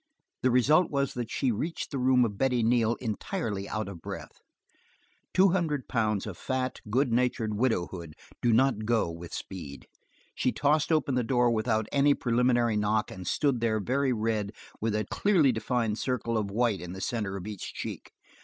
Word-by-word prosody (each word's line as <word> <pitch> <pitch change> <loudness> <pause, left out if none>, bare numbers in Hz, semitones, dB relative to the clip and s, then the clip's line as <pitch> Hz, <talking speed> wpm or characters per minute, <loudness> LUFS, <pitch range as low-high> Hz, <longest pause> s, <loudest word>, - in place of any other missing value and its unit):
The 130 - +3
result 150 +8 +4
was 140 -1 0
that 120 -2 -4
she, 130 -1 0
reached 155 +10 -3
the 140 - -2
room 125 -1 +4
of 105 -3 -3
Betty 125 +1 +1
Neal 115 0 +3
entirely 110 - -3
out 110 -1 -2
of 90 -4 -8
breath; - - -8 0.9
two 190 +2 +5
hundred 160 -7 0
pounds 110 -4 0
of 100 -6 -7
fat, 130 0 -2
good 125 +2 +2
natured 120 -3 +1
widowhood 90 -8 -1 0.3
do 120 - +3
not 115 -2 +3
go 115 -7 +2
with 85 0 -9
speed. 75 -8 -7 0.5
She 125 - 0
tossed 150 +4 +1
open 155 -4 +2
the 125 -1 +1
door 120 0 +2
without 110 -1 +1
any 140 0 +4
preliminary 120 -2 +2
knock 105 +1 +1
and 90 -2 -8
stood 140 0 +1
there 110 -2 +1
very 130 +6 +1
red 110 -3 -1 0.3
with 110 -1 0
a 105 -1 0
clearly 175 - +3
defined 115 -1 -1
circle 120 -3 -1
of 105 -2 0
white 110 -1 +1
in 90 0 -7
the 95 - -7
center 105 -5 -2
of 95 - -7
each 105 -3 -6
check. - - -6
115 Hz, 180 wpm, -28 LUFS, 105-130 Hz, 0.9 s, two